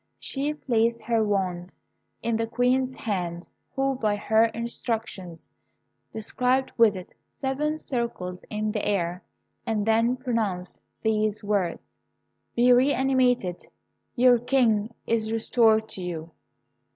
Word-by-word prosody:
She 290 +2 -3
placed 235 -4 0
her 225 -1 +2
wand 185 -4 -1 0.5
in 230 -1 0
the 225 0 0
Queen's 255 +2 +1
hand, 175 -5 -3 0.3
who, 270 0 +1
by 215 -5 0
her 220 +2 +3
instructions, 225 -6 -4 0.6
described 250 +4 0
with 225 -4 +5
it 185 -1 -9 0.3
seven 295 +3 -1
circles 235 -11 -4
in 215 0 -1
the - - -2
air, 180 -3 -1 0.4
and 220 -3 -1
then 230 +2 +3
pronounced 220 -8 -2 0.3
these 215 -1 0
words: 200 -4 -1 0.7
"Be 245 +1 +6
re 255 +3 +4
animated. 250 -8 +1 0.5
Your 245 -1 +5
King 235 -4 +2
is 220 -1 0
restored 225 -1 +3
to 190 - -5
you." 170 -2 -5
225 Hz, 120 wpm, -26 LUFS, 205-250 Hz, 0.7 s, Be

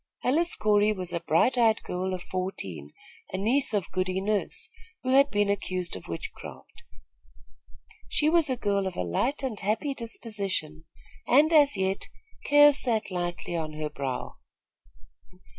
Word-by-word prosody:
Alice 330 +7 +2
Corey 210 0 +3
was 185 -3 -6
a 170 - 0
bright 170 +10 +2
eyed 225 -2 +3
girl 185 +1 -3
of 180 - -8
fourteen, 95 - -5 0.4
a 185 - -3
niece 235 +8 +3
of 205 -4 -1
Goody 185 0 -1
Nurse 205 +1 0 0.4
who 255 - -2
had 275 +2 +5
been 205 -3 +1
accused 185 -3 -2
of 95 - -10
witchcraft. 85 -1 -9 1.3
She 300 - +2
was 325 -2 +3
a 255 - -1
girl 200 -3 0
of 190 - -5
a - - -2
light 250 - -1
and 245 -6 -3
happy 220 +8 -1
disposition, 200 - -5 0.4
and, 300 +6 +5
as 290 -7 +5
yet, 190 0 -1 0.4
cares 290 0 +6
sat 225 -5 -1
lightly 175 -1 -3
on 155 -2 -3
her 150 0 -4
brow. 135 -2 -5
200 Hz, 150 wpm, -27 LUFS, 180-250 Hz, 1.3 s, cares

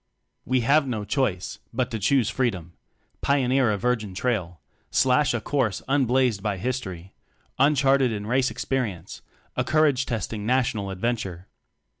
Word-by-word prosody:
We 130 0 +1
have 140 +4 +3
no 110 -5 -3
choice 105 -5 -1
but 125 +1 -1
to 110 - -3
choose 120 +2 +2
freedom: 95 -11 -2 0.5
pioneer 135 -3 +2
a 105 - 0
virgin 110 -3 -1
trail, 95 - -2 0.3
slash 130 +2 +3
a 120 - -1
course 115 -5 -1
unblazed 130 -5 +2
by 105 -1 -2
history, 95 -6 -4 0.5
uncharted 135 -2 +4
in 105 -2 -4
race 130 +3 +1
experi 125 -9 -2
ence 85 +3 -12 0.3
a - - +1
courage 150 -5 +2
testing 110 -2 -3
National 115 -4 0
Ad 95 -1 -6
venture. 95 -6 -2
120 Hz, 145 wpm, -25 LUFS, 100-130 Hz, 0.5 s, uncharted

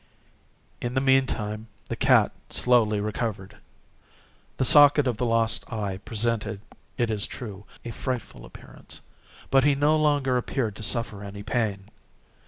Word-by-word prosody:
In 120 0 -4
the - - +3
meantime 115 -5 0 0.2
the - - -4
cat - - +3 0.2
slowly 115 -4 +2
recovered. 105 -2 -4 1.0
The 130 - +2
socket 145 0 +7
of 125 -4 -1
the 125 - -1
lost 115 +1 0
eye 100 -4 -3
presented, 110 0 -2 0.4
it 120 -2 0
is 105 -2 -1
true, 105 -4 -9 0.2
a 120 - -5
frightful 125 +1 -5
appearance, - - -12 0.5
but 135 -1 +4
he 145 0 +3
no 145 +2 +2
longer 145 -4 +1
appeared 120 -3 -2
to - - -9
suffer 105 -1 -2
any 100 0 -8
pain. 105 -4 -2
115 Hz, 140 wpm, -25 LUFS, 105-130 Hz, 1.0 s, socket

